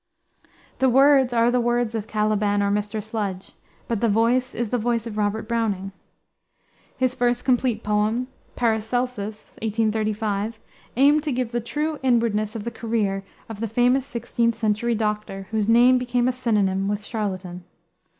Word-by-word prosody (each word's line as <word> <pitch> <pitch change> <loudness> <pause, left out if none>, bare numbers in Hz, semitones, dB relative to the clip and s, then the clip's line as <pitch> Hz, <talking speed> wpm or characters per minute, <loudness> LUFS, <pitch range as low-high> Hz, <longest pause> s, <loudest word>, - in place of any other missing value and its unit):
The 265 - +4
words 270 0 +5
are 235 0 +3
the 250 0 +2
words 240 -1 0
of 220 -1 -3
Caliban 210 -1 +1
or 200 - +1
Mr. 210 +1 -2
Sludge; 205 -4 -4 0.4
but 230 -3 -2
the 230 - +3
voice 240 +4 +2
is 235 -2 -2
the 245 - 0
voice 230 0 0
of 225 -2 -6
Robert 210 +1 -1
Browning. 210 -5 -1 1.1
His 255 -1 +1
first 245 -1 0
complete 245 -3 +1
poem, 210 +4 0 0.3
Paracelsus, 220 -2 -2
1835, 215 -1 -1 0.4
aimed 290 +3 +5
to 300 -1 -2
give 250 -2 -2
the 240 0 -1
true 300 +5 -3
inwardness 230 -4 +1
of 220 - -4
the 235 - -4
career 210 -5 -1 0.2
of 220 -2 -8
the 230 - -2
famous 250 +5 +1
16th 235 -1 0
century 225 +1 0
doctor, 210 -3 -3
whose 220 -1 0
name 245 +2 +6
became 245 0 0
a - - +3
synonym 205 -6 0
with 205 0 -2
charlatan. 185 -5 -4
225 Hz, 155 wpm, -23 LUFS, 210-245 Hz, 1.1 s, name